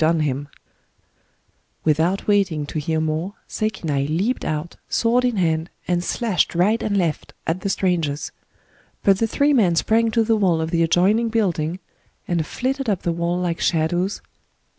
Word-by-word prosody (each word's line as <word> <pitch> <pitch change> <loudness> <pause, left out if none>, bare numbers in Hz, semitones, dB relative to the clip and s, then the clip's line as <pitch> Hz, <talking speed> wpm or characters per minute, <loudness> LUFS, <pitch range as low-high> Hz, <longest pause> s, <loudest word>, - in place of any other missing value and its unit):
• 160 +1 +4
• 145 -3 -1 1.4
• 160 +5 +1
waiting 195 -8 +2
to 155 - -4
Sekinai 160 0 -2
leaped 195 +11 0
out, 155 +2 -3
sword 235 +2 +2
in 245 -2 +1
hand, 160 -3 0 0.2
and 175 -1 +1
slashed 210 -4 0
right 205 +7 +2
and 205 -2 0
left, 170 -5 -2
at 165 +3 -1
the 200 - -2
strangers. 170 -7 -1 0.7
But 195 -1 +4
the 225 - +2
three 285 +5 +2
men 195 -10 +3
sprang 225 +6 +2
to 225 +1 +2
the 225 0 +2
wall 180 -6 +2
of 160 0 -2
the 165 - +2
adjoining 195 +8 +3
building, 180 -7 0 0.5
and 170 -2 0
flitted 265 0 -2
up 195 -4 -1
the 170 - 0
wall 170 +1 -1
like 175 -2 -1
shadows, 175 +4 +1
and - - -33
175 Hz, 160 wpm, -22 LUFS, 160-215 Hz, 1.4 s, •